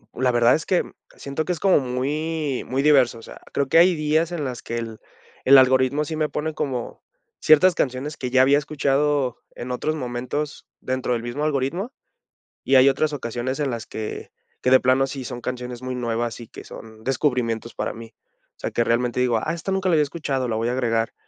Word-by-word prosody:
La 130 0 +2
verdad 120 0 +4
es 160 - -4
que, 185 - +2
mm, - - -14 0.2
siento 140 +3 -4
que - - -2
es 170 - -7
como 190 -2 +4
muy 145 +3 -2
muy 130 +1 0
diverso, 135 -6 +4
o - - -13
sea, - - -12
creo 140 - 0
que 165 - +4
hay 180 +1 +5
días 155 +2 +1
en 170 -4 -3
las 125 -3 -5
que 120 - -4
el 115 -2 -6 0.5
el 135 +1 +8
algoritmo 130 +3 +4
sí 155 - -4
me 155 -1 0
pone 155 +1 -3
como 130 -5 -4 0.4
ciertas 165 +4 +5
canciones 135 +3 -2
que 125 - -4
ya 130 +1 +4
había 140 +2 +5
escuchado 145 -2 0 0.2
en 125 +1 -6
otros 155 +5 -1
momentos 130 +2 -4
dentro 130 -1 -2
del 115 -1 -2
mismo 120 +5 -4
algoritmo, 155 - -1 0.7
y 135 - +2
hay 130 +1 +7
otras 150 +3 0
ocasiones 125 0 -3
en 145 -2 0
las 115 -2 -5
que 110 -1 -6 0.3
que 125 - +1
de 130 - +8
plano 130 +1 +3
sí 135 -2 -6
son 120 0 -6
canciones 125 0 -5
muy 130 0 -3
nuevas 120 -1 -2
y 120 - -10
que - - -11
son 110 -1 -12
descubrimientos 125 -4 -1
para - - -3
mí. 115 0 -11 0.4
O - - -61
sea, - - -4
que 120 - +1
realmente 120 +1 0
digo: 125 -2 +2
"Ah, 155 +9 -2
esta 170 +3 -4
nunca 190 -1 0
la - - +2
había 155 -2 +4
escuchado, 140 -4 -2
la 115 - -1
voy 115 +2 -1
a - - 0
agregar". 115 -3 0
130 Hz, 215 wpm, -23 LUFS, 120-150 Hz, 0.7 s, el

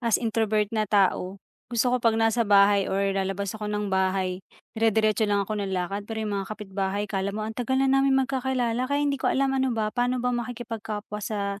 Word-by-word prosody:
as 230 -3 +2
introvert 220 -2 +1
na 215 -2 0
tao, 195 -2 +2 0.3
gusto 245 +1 +1
ko - - +4
pag 230 -1 +3
nasa 225 +1 +2
bahay 200 -1 +5
or 195 +1 0
lalabas 195 0 -2
ako 215 -1 -5
ng 210 -1 -2
bahay, 190 -1 0 0.3
dire-diretso 220 -1 +2
lang 200 -1 +1
ako 210 +1 -3
ng 190 -1 -2
lakad 195 +3 -3
pero 220 -1 -3
yung 205 -2 -2
mga 195 - -7
kapitbahay 195 -1 -3
akala 200 0 -3
mo 215 - -3
ang 220 - -4
tagal 250 +3 -1
na 270 - +3
naming 270 0 +3
magkakilala 255 -3 -1
kaya 285 +1 +1
hindi 280 -2 -1
ko - - +1
alam 270 0 +1
ano 265 -3 0
ba 215 -1 -1
paano 245 0 0
ba 250 - +1
makikipagkapwa 225 -3 -5
sa 200 -1 -3
215 Hz, 205 wpm, -26 LUFS, 200-240 Hz, 0.3 s, bahay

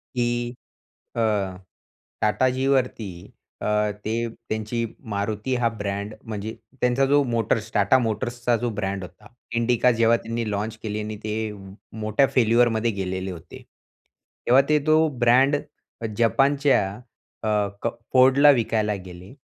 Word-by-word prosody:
की 120 0 0 0.7
अ, 115 - 0 1.0
टाटाजींवरती 130 -1 +1 0.5
अ, 105 0 +1
ते 110 - -1 0.4
त्यांची 110 +2 -2 0.3
MARUTI 105 +5 -2
हा 120 - +3
ब्रँड 100 +1 -3
म्हणजे 110 0 -5 0.3
त्यांचा 125 +2 +3
जो 145 +1 +4
मोटर्स, 115 -3 -1
TATA 105 +5 +4
मोटर्सचा 120 +2 -1
जो 120 - +1
ब्रँड 95 -1 -2
होता. 90 +4 -13 0.3
इंडिका 120 +1 +3
जेव्हा 115 0 +3
त्यांनी 115 -1 -4
लॉन्च 105 +2 -3
केली 105 -1 -3
आणि 105 0 -5
ते 110 0 -2 0.5
मोठ्या 110 +6 +2
फेल्युअरमध्ये 115 -1 +3
गेलेले 95 -1 -3
होते. 85 -1 -11 0.9
तेव्हा 130 +3 +7
ते 150 0 +4
तो 155 +1 +5
ब्रँड 130 +4 +5 0.5
अ, - - -3
जपानच्या 135 +4 +3 0.6
अ, 110 - 0 0.3
क - - +1 0.3
Fordला 135 +3 +7
विकायला 110 -3 0
गेले 90 +3 -11
115 Hz, 125 wpm, -24 LUFS, 105-125 Hz, 1.0 s, तेव्हा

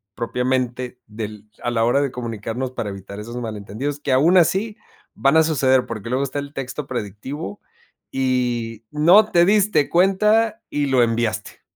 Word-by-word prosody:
propiamente 125 +1 -2
del 105 -1 -7 0.2
a - - 0
la 115 -1 +1
hora 125 +4 +3
de 140 -2 -1
comunicarnos 120 +1 -4
para 110 -4 -4
evitar 100 +1 -9
esos 115 +3 -8
malentendidos, 115 +5 -4
que 145 - -2
aún 155 +8 +5
así 195 +5 +2 0.4
van 135 +3 +3
a 160 - +6
suceder, 130 -5 +2
porque, 115 -2 -6
luego 130 +3 0
está 140 +1 -3
el 140 0 -7
texto 135 +1 -5
predictivo 105 +1 -5 0.5
y 120 -4 -1
no 175 +9 +5
te 170 0 +5
diste 205 -5 +3
cuenta 210 +5 +3
y 145 -1 0
lo 130 -2 +4
enviaste. 115 -2 -2
130 Hz, 160 wpm, -21 LUFS, 115-150 Hz, 0.5 s, a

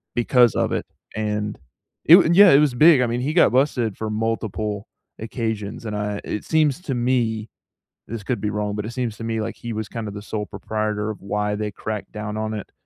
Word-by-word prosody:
because 120 0 +4
of - - 0
it. - - -2 0.3
And 105 -1 -2 0.5
it 165 - +10
wa 190 - +6
And 170 - +2
yeah, 200 0 +9
it 140 - +7
was 150 -4 +3
big, 150 +1 +6
I 125 - +2
mean, 120 +1 -2
he 150 +4 -1
got 175 - +5
busted 125 -5 +1
for 110 -1 -3
multiple 110 -2 -2 0.3
occasions 110 -2 -4
and 105 -1 -3
I 105 0 -3
it 105 - -4
seems 155 -2 +2
to 135 - -3
me 120 -3 0 0.6
this 115 -1 -5
could 120 +2 -2
be 105 0 -1
wrong, 105 -1 -2
but 105 0 -3
it 110 - -5
seems 120 -3 -3
to - - -7
me 115 -1 -2
like 110 - -4
he 120 -1 -6
was 110 -1 -4
kinda 110 -3 -5
the 105 0 -7
sole 105 0 -4
proprietor 110 0 -3
of 110 - -6
why 105 +1 -1
they 105 0 -3
cracked 105 -1 -5
down 105 0 -5
on 110 0 -2
it 105 -2 -6
110 Hz, 225 wpm, -22 LUFS, 105-120 Hz, 0.6 s, it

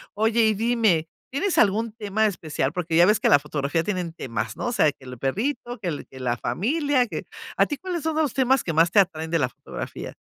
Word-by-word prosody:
Oye, 220 +2 +2
y 220 - +3
dime, 220 -7 +2 0.2
¿tienes 325 +4 -1
algún 220 +2 +2
tema 215 0 -1
especial? 155 -8 -1
Porque 170 -2 -2
ya 170 - +7
ves 210 +3 +3
que - - +2
la 145 - +7
fotografía 150 +2 -2
tienen 180 -4 -3
temas, 125 -8 -4
¿no? - - -3
O 240 - 0
sea, 155 -10 +3
que 135 - -19
el 125 0 -8
perrito, 240 - -2
que 190 - -5
el 150 - -5
que 130 - -13
la 120 -1 -1
familia, 285 - +1
que - - -5 0.3
a - - +5
ti, 290 - -3
¿cuáles 360 -1 -4
son 320 -1 -1
los 310 -5 +1
temas 265 -1 +2
que 165 - -2
más 165 +2 +4
te 205 - +5
atraen 160 -4 +1
de 165 - +2
la 130 -4 +1
fotografía? - - -8
200 Hz, 235 wpm, -24 LUFS, 160-240 Hz, 0.3 s, ya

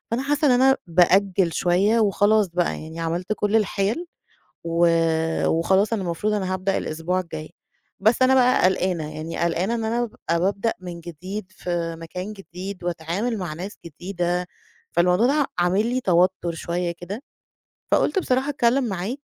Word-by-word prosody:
فأنا 240 +3 0
حاسَّة 290 +2 +1
إن - - +5
أنا 265 +1 +5
بأجِّل 180 +1 +3
شوية 195 +6 +2
وخلاص 210 -1 +3
بقى 175 0 -1
يعني، 160 +1 -8
عملت 170 +4 -2
كل 210 +2 +1
الحِيَل، 215 - 0 0.6
وخلاص 165 +3 +2
أنا 215 - -1
المفروض 185 +4 -1
أنا 190 -2 -1
هابدأ 190 +1 0
الأسبوع 165 +4 -2
الجاي. 160 -3 -7 0.5
بس 220 +5 +3
أنا 260 +1 +5
بقى 250 -4 +4
قلقانة، 180 -4 0
يعني 160 +2 -5
قلقانة 170 +6 0
إن 225 - -3
أنا 235 +2 0
أبقى 170 -7 -2
بابدأ 200 +5 0
من 175 -2 -7
جديد 185 +5 -7
في 170 -2 -3
مكان 180 +5 -6
جديد، 190 -1 -8
وأتعامَل 175 +7 -2
مع 180 -5 -4
ناس 185 +6 -7
جديدة، 175 +1 -3 0.4
فالموضوع 180 +7 +3
ده 285 0 +2
عامل 185 +5 +2
لي 255 +1 -1
توتُّر 180 -1 +2
شوية 170 +1 -2
كده. 190 +9 -7 0.7
فقُلت - - +3
بصراحة 265 -5 0
أتكلَّم 260 -1 +2
معاك 195 +8 -3
185 Hz, 150 wpm, -23 LUFS, 170-215 Hz, 0.7 s, إن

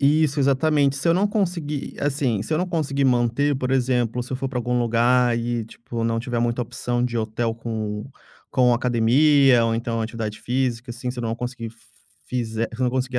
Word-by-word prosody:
Isso, 145 0 +3
exatamente, 140 +1 +2
se 140 - 0
eu 165 - +5
não 200 +3 +3
conseguir, 170 -8 -2
assim, 135 -7 0
se 135 - -4
eu 155 - +2
não 180 - 0
conseguir 140 -5 -1
manter 125 +3 +2
por 130 -1 -2
exemplo, 125 -2 +1
se 125 - -8
eu - - 0
for 135 0 -3
para 130 - -3
algum 125 0 0
lugar 120 +1 +3
e 120 -1 -2
tipo 115 +1 -7
não 115 0 0
tiver 120 0 -2
muita 120 +1 0
opção 120 +1 -2
de 120 -1 -2
hotel 115 +1 -1
com 110 -2 -4 0.5
com 125 -2 +4
academia 125 +2 +4
ou 115 0 +1
então 115 0 -2
atividade 110 -2 -4
física, 125 -1 -1
assim, 125 +1 -4
se 125 - -8
eu - - -3
não 115 -1 -1
conseguir 120 -2 -5 0.6
fizer 115 -2 -2
se 120 - -8
eu 130 - +3
não 125 - +2
conseguir 130 0 -1
125 Hz, 205 wpm, -23 LUFS, 115-135 Hz, 0.6 s, eu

